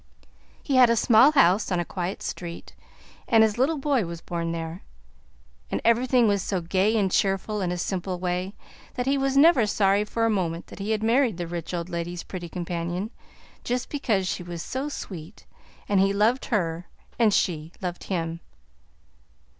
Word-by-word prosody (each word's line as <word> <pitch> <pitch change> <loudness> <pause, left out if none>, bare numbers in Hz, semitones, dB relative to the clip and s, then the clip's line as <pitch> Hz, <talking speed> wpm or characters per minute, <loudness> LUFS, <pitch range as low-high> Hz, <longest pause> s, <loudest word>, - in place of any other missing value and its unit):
He 275 -3 +1
had 250 -2 +7
a 235 - +4
small 235 +5 +5
house 200 - +4
on 180 - +1
a 175 - -1
quiet 180 +2 -4
street, 170 -1 -6 0.5
and 225 -2 +5
his 220 +1 +1
little 295 +5 +2
boy 275 -4 +1
was 170 -1 -6
born 170 0 -3
there, 165 +1 -5 0.9
and - - -1
everything 240 +1 +4
was 200 -2 +2
so 190 0 -1
gay 190 +6 +1
and 195 -3 +1
cheerful, 195 +2 0
in 180 -2 -1
a 180 - -2
simple 185 +1 -3
way, 180 +2 -3 0.4
that 250 - -2
he 275 +1 +2
was 270 0 0
never 280 -7 +6
sorry 200 0 +2
for 225 +2 -1
a - - +2
moment 175 -4 -2
that - - -12
he 200 +2 -4
had 220 -1 0
married 235 -3 +2
the 175 - -3
rich 170 -1 -5
old 170 -1 -3
lady's 170 0 -4
pretty 175 -2 -7
companion 175 +3 -4 0.5
just 245 +1 -2
because 220 -10 0
she 185 - -2
was 175 -1 -6
so 270 +3 -3
sweet 185 - -8 0.4
and 200 -2 +2
he 195 +1 +3
loved 220 +6 +2
her 175 -6 -1 0.3
and 225 -3 +5
she 160 -5 0
loved 180 -2 -5
him. 165 -3 -3
195 Hz, 180 wpm, -25 LUFS, 175-230 Hz, 0.9 s, had